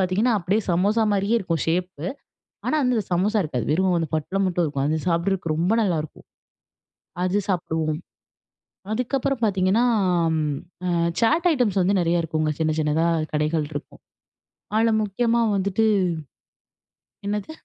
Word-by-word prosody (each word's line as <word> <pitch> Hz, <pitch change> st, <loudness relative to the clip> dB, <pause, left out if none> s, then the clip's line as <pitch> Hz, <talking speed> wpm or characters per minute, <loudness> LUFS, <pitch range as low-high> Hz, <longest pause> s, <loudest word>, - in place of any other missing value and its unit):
பார்த்தீங்கன்னா, 195 Hz, +6 st, +2 dB
அப்பிடியே 195 Hz, +5 st, 0 dB
சமோசாமாரியே 205 Hz, +3 st, +2 dB
இருக்கும் 170 Hz, -5 st, -2 dB
ஷேப்பு. 175 Hz, -2 st, -2 dB, 0.6 s
ஆனா, -, -, +1 dB
வந்து 250 Hz, -2 st, +2 dB
அந்த 205 Hz, -, -1 dB
சமோசா 205 Hz, +5 st, +2 dB
இருக்காது. 130 Hz, -6 st, -3 dB
வெறும் 180 Hz, +1 st, +2 dB
அந்த 160 Hz, -, -2 dB
பொட்டலம் 190 Hz, +6 st, -1 dB
மட்டும் 175 Hz, -2 st, 0 dB
இருக்கும். 140 Hz, -2 st, -2 dB
அது 155 Hz, +1 st, 0 dB
சாப்பிடுறதுக்கு 170 Hz, -1 st, 0 dB
ரொம்ப 170 Hz, +5 st, +1 dB
நல்லாயிருக்கும். 160 Hz, -7 st, -2 dB, 1.0 s
அது 190 Hz, +3 st, +1 dB
சாப்பிடுவோம். 160 Hz, -4 st, -1 dB, 0.9 s
அதுக்கப்பறம் 255 Hz, +2 st, -1 dB
பார்த்தீங்கன்னா, 195 Hz, +4 st, +2 dB, 0.5 s
ம் 150 Hz, -2 st, -1 dB, 0.3 s
அ -, -, +1 dB, 0.3 s
சாட் 325 Hz, +10 st, +3 dB
ஐட்டம்ஸ் 210 Hz, -8 st, +1 dB
வந்து 195 Hz, +1 st, +2 dB
நிறைய 170 Hz, 0 st, +2 dB
இருக்குங்க. 155 Hz, -1 st, -1 dB
சின்ன, 155 Hz, -1 st, +1 dB
சின்னதா 155 Hz, +2 st, +1 dB, 0.3 s
கடைகள் 150 Hz, 0 st, 0 dB
இருக்கும். 145 Hz, -, -8 dB, 0.8 s
அதுல 225 Hz, +1 st, +3 dB
முக்கியமாக 230 Hz, +1 st, +1 dB
வந்துட்டு 200 Hz, +3 st, +1 dB, 1.4 s
என்னது? 210 Hz, +7 st, -3 dB
185 Hz, 130 wpm, -23 LUFS, 160-215 Hz, 1.4 s, சாட்